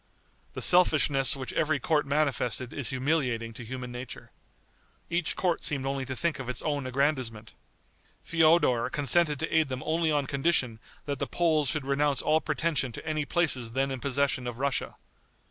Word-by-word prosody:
The -, -, -3 dB
selfishness 150 Hz, -7 st, +5 dB
which 130 Hz, -2 st, -6 dB
every 155 Hz, -2 st, +1 dB
court 150 Hz, +2 st, +1 dB
manifested 130 Hz, -5 st, -1 dB
is 140 Hz, -4 st, -4 dB
humiliating 130 Hz, -4 st, -1 dB
to 120 Hz, +1 st, -9 dB
human 125 Hz, +1 st, -6 dB
nature. 125 Hz, +1 st, -8 dB, 0.8 s
Each 170 Hz, -1 st, 0 dB
court 180 Hz, -3 st, 0 dB
seemed 135 Hz, -3 st, -1 dB
only 135 Hz, -1 st, -2 dB
to 130 Hz, 0 st, -4 dB
think 170 Hz, +2 st, 0 dB
of 130 Hz, -2 st, -5 dB
its 125 Hz, -, -2 dB
own 145 Hz, -4 st, -2 dB
aggrandizement. 130 Hz, -5 st, -1 dB, 0.7 s
Feodor 160 Hz, -7 st, +3 dB
consented 150 Hz, +1 st, +1 dB
to 160 Hz, -, -2 dB
aid 160 Hz, -3 st, +3 dB
them 130 Hz, 0 st, -4 dB
only 160 Hz, 0 st, +1 dB
on 145 Hz, -2 st, +1 dB
condition 135 Hz, -5 st, 0 dB, 0.3 s
that 140 Hz, -1 st, -3 dB
the -, -, -2 dB
Poles 155 Hz, -5 st, +1 dB
should 150 Hz, -2 st, -2 dB
renounce 140 Hz, 0 st, +1 dB
all 155 Hz, +1 st, +3 dB
pretension 155 Hz, -3 st, -1 dB
to -, -, -9 dB
any 155 Hz, -2 st, -1 dB
places 130 Hz, -9 st, 0 dB
then 135 Hz, +1 st, 0 dB
in 130 Hz, -, -4 dB
possession 140 Hz, -1 st, 0 dB
of 120 Hz, -1 st, -5 dB
Russia. 140 Hz, 0 st, -2 dB
140 Hz, 170 wpm, -28 LUFS, 130-155 Hz, 0.8 s, selfishness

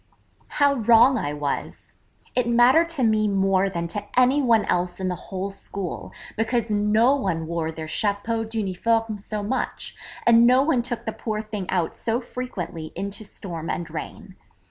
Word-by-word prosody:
How 285 Hz, -1 st, +5 dB
wrong 235 Hz, +1 st, +5 dB
I 145 Hz, -, -2 dB
was! 145 Hz, -1 st, -4 dB, 0.4 s
It 250 Hz, -2 st, +1 dB
mattered 255 Hz, +8 st, +5 dB
to 310 Hz, -6 st, 0 dB
me 215 Hz, -2 st, +3 dB
more 195 Hz, -1 st, +2 dB
than 170 Hz, -2 st, -3 dB
to 205 Hz, +4 st, -3 dB, 0.2 s
any 260 Hz, +3 st, +4 dB
one 230 Hz, -5 st, +3 dB
else 180 Hz, 0 st, -1 dB
in 185 Hz, -1 st, -1 dB
the -, -, -1 dB, 0.2 s
whole 190 Hz, +1 st, -3 dB
school, 195 Hz, -2 st, -6 dB, 0.2 s
because 225 Hz, 0 st, 0 dB
no 210 Hz, +5 st, +3 dB
one 180 Hz, -, -2 dB
wore 165 Hz, -1 st, -2 dB
their 160 Hz, 0 st, -7 dB
chapeau 210 Hz, +6 st, -1 dB
d'uniforme 220 Hz, +1 st, -1 dB
so 210 Hz, +1 st, -4 dB
much, 260 Hz, +6 st, -3 dB, 0.3 s
and 235 Hz, 0 st, +6 dB
no 255 Hz, +2 st, +5 dB
one 280 Hz, -5 st, +2 dB
took 235 Hz, -1 st, -4 dB
the 220 Hz, -, -2 dB
poor 215 Hz, -2 st, -3 dB
thing 210 Hz, -3 st, -5 dB
out 175 Hz, -3 st, 0 dB
so 230 Hz, +1 st, -1 dB
frequently 185 Hz, -11 st, -6 dB
into 200 Hz, +2 st, -4 dB
storm 170 Hz, -5 st, -7 dB
and 170 Hz, -2 st, -3 dB
rain. 160 Hz, -, -7 dB
215 Hz, 165 wpm, -24 LUFS, 185-235 Hz, 0.4 s, and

